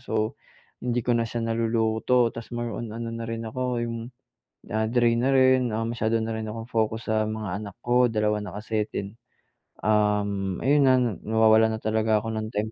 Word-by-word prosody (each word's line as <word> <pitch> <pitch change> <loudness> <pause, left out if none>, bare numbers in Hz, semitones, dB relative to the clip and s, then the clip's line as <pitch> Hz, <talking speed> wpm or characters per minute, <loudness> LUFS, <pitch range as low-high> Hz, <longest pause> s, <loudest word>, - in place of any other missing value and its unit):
So, 110 -3 -2 0.4
hindi 120 0 0
ko 120 - +2
na 115 -1 0
siya 115 +1 -3
naluluto. 115 +1 +1
'Tas 115 +1 -9
more 120 0 -3
on 115 - -5
na 115 0 -5
rin 115 0 -4
ako 125 0 -2
'yong, 115 0 -3 0.7
ah, 110 0 0
drain 120 0 +2
na 130 +2 +2
rin, 130 -1 +5
ah, 115 - -1
masyado 115 -1 -1
na 115 - -3
rin 110 0 -4
akong 115 +2 -6
focus 110 0 -1
sa 110 0 +2
mga 110 -2 -4
anak 100 -3 -8
ko, 125 +1 +4
dalawa 105 -1 0
na 105 -1 -7
kasi, 105 0 -2
then, 100 +3 -5 0.7
um, 105 -3 +1
ayun 145 +2 +4
na 130 - +6
na 125 -3 +1
nawawalan 110 0 +4
na - - -14
talaga 110 0 +2
ako 115 - -3
ng 110 0 -3
time 110 0 -2
110 Hz, 195 wpm, -25 LUFS, 110-120 Hz, 0.7 s, na